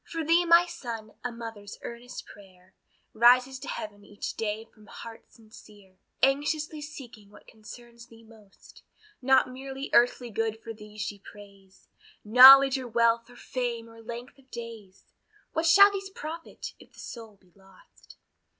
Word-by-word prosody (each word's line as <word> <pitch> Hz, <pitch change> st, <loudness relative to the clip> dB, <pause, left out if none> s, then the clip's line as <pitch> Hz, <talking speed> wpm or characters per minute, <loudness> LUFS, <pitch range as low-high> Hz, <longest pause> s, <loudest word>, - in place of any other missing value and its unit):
For 330 Hz, -1 st, -5 dB
thee, 335 Hz, +3 st, +3 dB
my 340 Hz, +1 st, +6 dB
son, 235 Hz, -11 st, -8 dB
a 245 Hz, -, -3 dB
mother's 225 Hz, -3 st, -9 dB
earnest 235 Hz, +1 st, -9 dB
prayer 185 Hz, -2 st, -18 dB, 0.4 s
Rises 250 Hz, +3 st, +4 dB
to 285 Hz, -, -10 dB
Heaven 205 Hz, -1 st, -7 dB
each 205 Hz, 0 st, -7 dB
day 220 Hz, 0 st, -4 dB
from 215 Hz, -2 st, -22 dB
heart 230 Hz, -1 st, -12 dB
sincere, 210 Hz, -4 st, -18 dB, 0.2 s
Anxiously 300 Hz, +3 st, 0 dB
seeking 245 Hz, -9 st, -11 dB
what -, -, -18 dB
concerns 235 Hz, +2 st, -14 dB
thee 230 Hz, 0 st, -18 dB
most; 220 Hz, -3 st, -19 dB, 0.4 s
Not 260 Hz, 0 st, +3 dB
merely 270 Hz, +1 st, -7 dB
earthly 245 Hz, 0 st, +3 dB
good 225 Hz, +1 st, -2 dB
for 225 Hz, 0 st, -8 dB
thee 210 Hz, -1 st, -14 dB
she 205 Hz, -1 st, -5 dB
prays, 200 Hz, -1 st, -17 dB, 0.4 s
Knowledge, 265 Hz, +4 st, +9 dB
or 255 Hz, -, -7 dB
wealth, 230 Hz, 0 st, +1 dB
or 245 Hz, -, -16 dB
fame, 240 Hz, -2 st, -4 dB
or 225 Hz, 0 st, -15 dB
length 240 Hz, +3 st, -9 dB
of 265 Hz, -1 st, -25 dB
days, 225 Hz, -5 st, -10 dB, 0.5 s
What 320 Hz, +1 st, 0 dB
shall 400 Hz, +5 st, +8 dB
these 390 Hz, -1 st, -5 dB
profit, 330 Hz, -2 st, -8 dB
if -, -, -19 dB
the -, -, -17 dB
soul 225 Hz, -3 st, -10 dB
be 185 Hz, -2 st, -29 dB
lost. 195 Hz, -1 st, -21 dB
235 Hz, 155 wpm, -27 LUFS, 210-265 Hz, 0.5 s, Knowledge